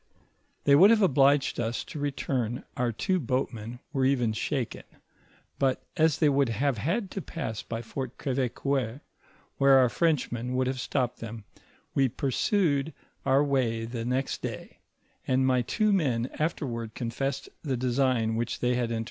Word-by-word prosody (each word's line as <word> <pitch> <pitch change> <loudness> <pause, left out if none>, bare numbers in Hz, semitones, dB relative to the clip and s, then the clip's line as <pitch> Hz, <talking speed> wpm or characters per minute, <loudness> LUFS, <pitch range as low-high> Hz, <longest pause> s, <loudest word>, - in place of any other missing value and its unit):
They 140 - +4
would 180 +8 +8
have 220 -2 +5
obliged 140 -5 +3
us 115 0 -1
to 150 - -8
return, 130 -4 -2
our 125 -1 0
two 185 - 0
boatmen 125 -3 -3
were 135 -2 +1
even 125 -4 +2
shaken, 125 +2 -2 0.8
but 135 -2 +1
as 160 -3 +3
they 155 - +3
would 140 -3 +3
have 125 +1 0
had 185 - -1
to 195 - -4
pass 130 -11 -5
by 115 0 -5
Fort 130 +1 -6
Gr^vecoeur, 130 -1 -1 0.6
where 135 -1 +6
our 130 -2 +5
Frenchmen 125 -5 0
would 130 0 +2
have 130 0 -2
stopped 125 0 -1
them, 115 -1 -7 0.5
we 135 -2 +3
pursued 145 - 0 0.3
our 135 +2 +5
way 125 -5 0
the 115 0 -4
next 130 +3 -1
day, - - -6 0.5
and 130 0 +2
my 130 -1 +3
two 215 - +1
men 130 -9 +1
afterward 120 -8 -2
confessed 130 +3 -3
the 135 -5 -2
design 125 -2 +1
which 120 +1 -2
they 125 0 +1
had 120 -1 0
entortained. 115 - -1
130 Hz, 155 wpm, -28 LUFS, 120-140 Hz, 0.8 s, would